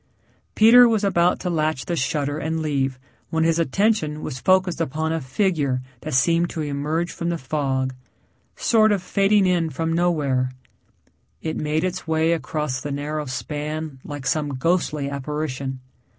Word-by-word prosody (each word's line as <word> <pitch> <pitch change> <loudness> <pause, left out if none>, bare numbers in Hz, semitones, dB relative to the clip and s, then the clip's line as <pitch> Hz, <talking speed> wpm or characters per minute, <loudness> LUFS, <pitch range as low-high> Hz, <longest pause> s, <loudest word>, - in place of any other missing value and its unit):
Peter 235 +2 +8
was 220 -2 +1
about 175 -3 +2
to - - -4
latch 155 -5 0
the 175 - -2
shutter 145 0 -1
and 160 +1 -2
leave 135 -3 -1 0.3
when 160 0 +1
his 165 0 +2
attention 165 -2 +1
was 130 - -5
focused 185 +4 +2
upon 160 +2 -1
a 165 - -2
figure 140 -2 0 0.2
that 155 0 -4
seemed 170 +6 +3
to 160 - -4
emerge 150 +4 -2
from 170 - -3
the 170 - -1
fog 130 -2 -1 0.6
sort 220 -2 +3
of 200 -3 0
fading 200 +1 +3
in 175 -3 +2
from 165 +3 -2
nowhere. 145 -7 +1 0.9
It 160 -1 -2
made 155 +2 -1
its 185 -2 -3
way 160 +1 +2
across 150 -3 -2
the 145 - -4
narrow 150 +2 -3
span 150 +2 -4
like 145 -2 -7
some 145 +2 0
ghostly 150 -1 0
apparition. 140 -2 -4
155 Hz, 155 wpm, -23 LUFS, 140-170 Hz, 0.9 s, Peter